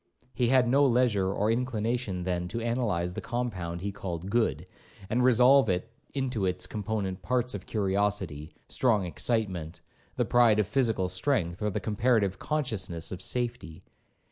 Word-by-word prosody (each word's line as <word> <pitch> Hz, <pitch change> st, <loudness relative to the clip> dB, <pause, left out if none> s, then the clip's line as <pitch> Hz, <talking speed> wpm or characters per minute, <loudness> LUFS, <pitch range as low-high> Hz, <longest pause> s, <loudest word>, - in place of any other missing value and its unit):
He 125 Hz, -, +1 dB
had 130 Hz, 0 st, +4 dB
no 140 Hz, +4 st, +4 dB
leisure 120 Hz, -7 st, +2 dB
or 105 Hz, +2 st, +1 dB
inclination, 115 Hz, -5 st, -1 dB
then, 90 Hz, -1 st, -2 dB
to 115 Hz, +6 st, -4 dB
analyse 115 Hz, -7 st, -1 dB
the -, -, -5 dB
compound 95 Hz, -9 st, -3 dB
he 100 Hz, +1 st, -3 dB
called 90 Hz, -1 st, -5 dB
good, 90 Hz, -, +1 dB, 0.5 s
and 125 Hz, +2 st, +2 dB
resolve 125 Hz, 0 st, +5 dB
it 90 Hz, +5 st, -1 dB, 0.2 s
into 125 Hz, -8 st, -1 dB
its 90 Hz, 0 st, -1 dB
component 100 Hz, -2 st, -3 dB
parts 125 Hz, +5 st, 0 dB
of 100 Hz, -3 st, -7 dB
curiosity, 95 Hz, -7 st, -1 dB
strong 110 Hz, -7 st, +2 dB
excitement, 90 Hz, -4 st, -2 dB, 0.3 s
the -, -, +1 dB
pride 120 Hz, -3 st, +4 dB
of 105 Hz, -, +2 dB
physical 110 Hz, -4 st, +1 dB
strength, 95 Hz, -2 st, -1 dB
or 105 Hz, -, +1 dB
the 95 Hz, -, -2 dB
comparative 105 Hz, -3 st, +1 dB
consciousness 110 Hz, -, -2 dB
of 95 Hz, -1 st, -6 dB
safety. 95 Hz, -9 st, -2 dB
105 Hz, 150 wpm, -28 LUFS, 90-120 Hz, 0.5 s, resolve